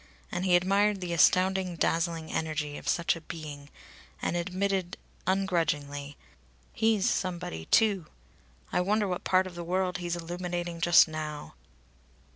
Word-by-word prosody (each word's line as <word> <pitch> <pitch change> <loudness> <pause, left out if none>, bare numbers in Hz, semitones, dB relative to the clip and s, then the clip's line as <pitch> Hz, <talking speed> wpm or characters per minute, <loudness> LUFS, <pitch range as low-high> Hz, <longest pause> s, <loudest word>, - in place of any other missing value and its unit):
And 175 - -2
he 180 -2 +5
admired 200 +3 +3
the 180 -2 -3
astounding, 185 +2 +3
dazzling 165 -1 0
energy 155 -2 -2
of - - -9
such 170 0 +2
a 165 - -9
being, 150 -3 -8 0.5
and - - -1
admitted 185 +1 -1 0.3
ungrudgingly: 150 -7 -1 0.6
"He's 220 -3 +2
somebody 175 - -2
too! 200 - +3 0.7
I - - +3
wonder 205 +3 +1
what 180 -1 -3
part 185 0 +3
of 185 - -8
the 170 0 -6
world 180 +1 0
he's 175 -1 -2
illuminating 175 0 -4
just 175 0 +7
now!" 155 -1 -6
175 Hz, 135 wpm, -29 LUFS, 160-185 Hz, 0.7 s, just